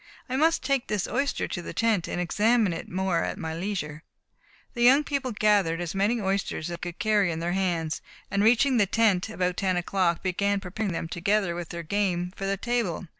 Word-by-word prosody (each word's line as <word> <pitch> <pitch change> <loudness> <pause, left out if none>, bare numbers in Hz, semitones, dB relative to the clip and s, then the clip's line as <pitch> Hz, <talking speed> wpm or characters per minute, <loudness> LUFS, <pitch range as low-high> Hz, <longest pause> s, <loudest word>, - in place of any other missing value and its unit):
I 255 - -3
must 320 +3 +2
take 270 -1 0
this 210 -3 -1
oyster 280 0 -1
to 175 - -4
the - - -8
tent, 225 -6 +1
and - - -3
examine 210 +3 +2
it 165 - -6
more 185 -2 0
at - - -3
my 160 0 -4
leisure." 165 -4 -4 0.7
The 240 - -4
young 265 +5 +6
people 280 -3 -2
gathered 205 -6 +2
as 175 -2 -3
many 205 +5 +1
oysters 190 -4 -2
as 170 - -4
they 175 - -5
could 170 - -12
carry 210 -4 +2
in 160 - -3
their 170 +1 -2
hands, 170 -4 -1 0.3
and 200 +1 +2
reaching 245 +4 +4
the 205 -3 +3
tent 210 -2 +2
about 180 -4 -1
ten 185 -2 +1
o'clock, 175 -1 0
began 200 +2 0
preparing 195 +2 -3
them, 165 -1 -3
together 185 +2 0
with 170 -1 -6
their 170 -1 -5
game, 180 -1 -1
for 195 - -4
the 195 0 0
table. 230 -6 -1
195 Hz, 210 wpm, -26 LUFS, 175-220 Hz, 0.7 s, young